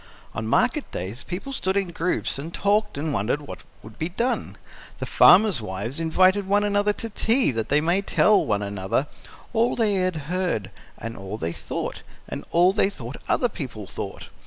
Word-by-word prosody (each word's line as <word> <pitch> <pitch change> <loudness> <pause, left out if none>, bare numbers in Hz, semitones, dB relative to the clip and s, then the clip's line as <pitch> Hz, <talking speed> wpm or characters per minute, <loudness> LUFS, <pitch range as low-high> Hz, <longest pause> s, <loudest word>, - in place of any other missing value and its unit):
On 110 -1 -4
market - - +1
days, 100 +9 -5
people 195 +10 -5
stood 190 -6 -1
in 195 -3 0
groups 170 -4 -1
and 160 +4 -6
talked 210 +1 +1
and 150 +1 -2
wondered 115 +9 0
what - - -8 0.2
would 110 +1 -13
be 160 - -1
done; 235 +8 -2 0.4
the - - -4
farmers' 185 - +6
wives 105 - -5
invited 185 +4 +3
one 205 +1 +3
another 205 0 +2
to 230 - -5
tea 230 - +3
that 115 -2 -3
they 145 +1 +4
might 175 +5 +1
tell 210 -1 +4
one 105 -2 0
another 100 +6 -1 0.5
all 235 +1 +2
they 220 -3 +2
had 185 -2 +1
heard 175 - -1 0.3
and 115 +1 -6
all 95 +2 -6
they 85 -4 -3
thought - - -5 0.3
and - - -6
all 180 +3 +4
they 200 -1 +3
thought 125 - -8
other 245 - +3
people 130 - -6
thought. - - -7
170 Hz, 185 wpm, -24 LUFS, -, 0.5 s, farmers